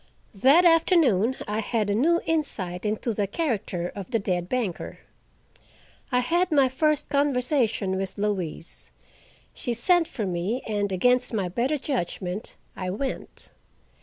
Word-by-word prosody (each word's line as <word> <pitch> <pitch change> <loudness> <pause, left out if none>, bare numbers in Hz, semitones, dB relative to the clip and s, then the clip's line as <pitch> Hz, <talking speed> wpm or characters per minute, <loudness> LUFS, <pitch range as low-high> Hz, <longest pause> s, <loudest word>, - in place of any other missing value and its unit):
That 305 +7 +6
afternoon 315 - +4
I 210 +1 -1
had 220 -1 -1
a 205 - +1
new 330 +11 +3
insight 210 - -1
into 220 +2 -1
the 205 -1 -1
character 210 - -2
of 200 +1 -7
the 235 - +1
dead 180 -4 -2
banker. 235 -8 -3 1.1
I 250 0 +3
had 345 +8 +1
my 275 -4 +4
first 305 +3 +1
conversation 250 -8 +1
with 195 +1 -4
Louise. 190 -6 -3 0.6
She 240 -2 -2
sent 345 +7 +3
for 220 - -4
me, 185 +7 -2
and 205 -2 -1
against 250 +6 +2
my 190 -4 -1
better 250 - 0
judgment 195 - -2 0.2
I 185 -1 -4
went. 240 +9 -4
230 Hz, 135 wpm, -25 LUFS, 195-280 Hz, 1.1 s, That